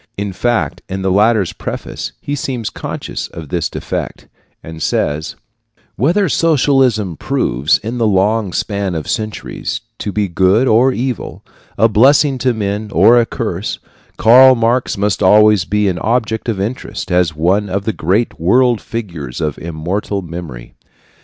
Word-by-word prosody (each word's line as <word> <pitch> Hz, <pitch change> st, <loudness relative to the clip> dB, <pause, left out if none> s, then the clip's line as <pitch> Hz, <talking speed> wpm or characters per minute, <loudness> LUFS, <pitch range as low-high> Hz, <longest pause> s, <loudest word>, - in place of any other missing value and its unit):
In 100 Hz, -1 st, -3 dB
fact, 120 Hz, +5 st, -1 dB
in 95 Hz, 0 st, -4 dB
the 95 Hz, -, +1 dB
latter's 105 Hz, -1 st, +2 dB
preface -, -, -6 dB
he 145 Hz, -, -5 dB
seems 130 Hz, -5 st, -3 dB
conscious -, -, -5 dB
of 80 Hz, -4 st, -10 dB
this 85 Hz, -2 st, -1 dB
defect, -, -, -5 dB, 0.4 s
and 80 Hz, 0 st, -9 dB
says: 75 Hz, +2 st, -1 dB, 0.6 s
Whether 175 Hz, -, +2 dB
socialism 135 Hz, -, +2 dB
proves, 70 Hz, +1 st, 0 dB
in 115 Hz, +3 st, -5 dB
the 115 Hz, -, +2 dB
long 105 Hz, +1 st, +1 dB
span 100 Hz, -1 st, -2 dB
of 80 Hz, -, -4 dB
centuries, 110 Hz, -, -4 dB, 0.2 s
to 105 Hz, -, -3 dB
be 105 Hz, 0 st, -1 dB
good 95 Hz, +7 st, +2 dB
or 125 Hz, +4 st, +4 dB
evil, 125 Hz, 0 st, -4 dB, 0.3 s
a 110 Hz, -, +5 dB
blessing 135 Hz, +5 st, +4 dB
to 130 Hz, -, +2 dB
men 105 Hz, 0 st, -3 dB
or 105 Hz, +8 st, +5 dB
a 115 Hz, -, -2 dB
curse, 100 Hz, -3 st, -3 dB, 0.4 s
Karl 130 Hz, +3 st, +7 dB
Marx 120 Hz, 0 st, 0 dB
must 100 Hz, 0 st, 0 dB
always 105 Hz, -1 st, +5 dB
be 105 Hz, +2 st, 0 dB
an 90 Hz, -2 st, -1 dB
object 110 Hz, 0 st, -1 dB
of 105 Hz, -4 st, -2 dB
interest 105 Hz, -2 st, -4 dB
as 90 Hz, -3 st, +2 dB
one 95 Hz, +6 st, +1 dB
of 100 Hz, +1 st, -2 dB
the 110 Hz, -, -1 dB
great 95 Hz, +8 st, -1 dB
world 120 Hz, +7 st, +3 dB
figures 85 Hz, -, -6 dB
of 75 Hz, -3 st, -3 dB
immortal 90 Hz, +5 st, -3 dB
memory. 80 Hz, -8 st, -8 dB
105 Hz, 155 wpm, -16 LUFS, 90-120 Hz, 0.6 s, Karl